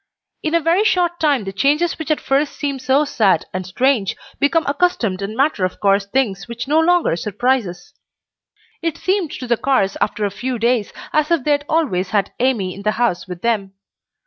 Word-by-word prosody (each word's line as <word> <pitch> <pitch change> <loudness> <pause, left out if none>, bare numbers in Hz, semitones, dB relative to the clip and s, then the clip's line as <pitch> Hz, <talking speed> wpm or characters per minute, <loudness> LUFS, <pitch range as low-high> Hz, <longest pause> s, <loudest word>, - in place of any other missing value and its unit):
In 315 +1 -1
a - - +5
very 335 +5 +2
short 350 -5 +1
time 285 -7 +2
the 195 0 -6
changes 300 - +1
which 320 - -5
at 310 - +2
first 280 +2 0
seem 280 -2 -3
so 265 +3 +2
sad 200 - +2
and 185 0 -4
strange 235 0 +1 0.2
become 320 +3 +2
accustomed 280 - 0
and 205 +3 -5
matter 275 -7 +1
of 185 - -2
course 200 0 +2
things 200 -4 -1
which 235 +2 -6
no 305 +3 +3
longer 345 - +3
surprise 220 +5 0
us. 175 0 -11 0.9
It 330 -2 -2
seemed 375 -3 0
to 255 - -6
the 240 -1 +1
Carrs 220 -8 +1
after 210 - 0
a 200 - -2
few 250 +5 -3
days 235 -1 +1 0.2
as 305 -1 +2
if 335 -6 +2
they 300 - +1
had 290 0 +1
always 220 - 0
had 200 -1 0
Amy 230 -8 +1
in 200 - -10
the 215 +1 0
house 230 -7 0
with 180 -1 -8
them. 210 -5 0
255 Hz, 200 wpm, -19 LUFS, 200-300 Hz, 0.9 s, a